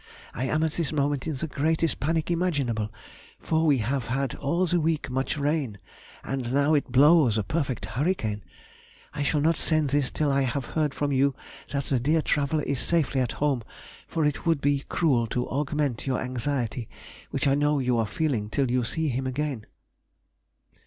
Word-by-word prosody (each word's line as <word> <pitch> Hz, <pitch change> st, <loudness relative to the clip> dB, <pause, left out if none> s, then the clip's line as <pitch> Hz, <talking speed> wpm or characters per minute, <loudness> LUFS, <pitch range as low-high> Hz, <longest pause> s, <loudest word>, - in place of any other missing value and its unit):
I 130 Hz, -, -2 dB
am 155 Hz, +4 st, +1 dB
at 160 Hz, -, +1 dB
this 165 Hz, -2 st, -1 dB
moment 145 Hz, -1 st, 0 dB
in 155 Hz, -, -2 dB
the 145 Hz, +5 st, -3 dB
greatest 160 Hz, +2 st, 0 dB
panic 160 Hz, +3 st, 0 dB
imaginable, 140 Hz, -12 st, 0 dB, 0.5 s
for 160 Hz, 0 st, 0 dB
we 145 Hz, -3 st, +5 dB
have 130 Hz, -1 st, -1 dB
had 135 Hz, +2 st, -1 dB
all 170 Hz, +6 st, 0 dB
the 175 Hz, 0 st, +1 dB
week 155 Hz, -4 st, -1 dB
much 130 Hz, +3 st, -1 dB
rain, 145 Hz, -7 st, -1 dB, 0.5 s
and 130 Hz, -3 st, -3 dB
now 140 Hz, +3 st, +3 dB
it 145 Hz, -3 st, +1 dB
blows 140 Hz, -3 st, +5 dB
a 105 Hz, -, +1 dB
perfect 135 Hz, -4 st, -2 dB
hurricane. 110 Hz, -, -1 dB, 0.7 s
I -, -, -4 dB
shall 145 Hz, +1 st, +1 dB
not 165 Hz, +2 st, +2 dB
send 155 Hz, -4 st, +1 dB
this 145 Hz, -2 st, +2 dB
till 150 Hz, -2 st, 0 dB
I 140 Hz, 0 st, +2 dB
have 130 Hz, 0 st, -1 dB
heard 150 Hz, 0 st, -1 dB
from 145 Hz, -1 st, -1 dB
you 135 Hz, 0 st, +2 dB, 0.3 s
that 140 Hz, 0 st, -1 dB
the 135 Hz, -2 st, 0 dB
dear 155 Hz, +5 st, +2 dB
traveller 150 Hz, +1 st, +1 dB
is 140 Hz, -2 st, -1 dB
safely 155 Hz, -5 st, +1 dB
at 125 Hz, -, -1 dB
home, 140 Hz, -4 st, 0 dB, 0.5 s
for 160 Hz, -2 st, 0 dB
it 150 Hz, -1 st, -1 dB
would 165 Hz, -3 st, +2 dB
be 140 Hz, 0 st, +1 dB
cruel 130 Hz, -9 st, +2 dB
to 125 Hz, +2 st, -2 dB
augment 145 Hz, -3 st, -1 dB
your 130 Hz, -, +1 dB
anxiety, 125 Hz, -2 st, -2 dB, 0.4 s
which -, -, -2 dB
I 135 Hz, -, +4 dB
know 145 Hz, +1 st, +2 dB
you 125 Hz, -3 st, +1 dB
are 110 Hz, -, +1 dB
feeling 115 Hz, -4 st, -1 dB
till 135 Hz, +1 st, 0 dB
you 125 Hz, 0 st, +2 dB
see 160 Hz, +6 st, -1 dB
him 130 Hz, +1 st, -2 dB
again. 130 Hz, -4 st, -3 dB
140 Hz, 185 wpm, -26 LUFS, 125-155 Hz, 0.7 s, we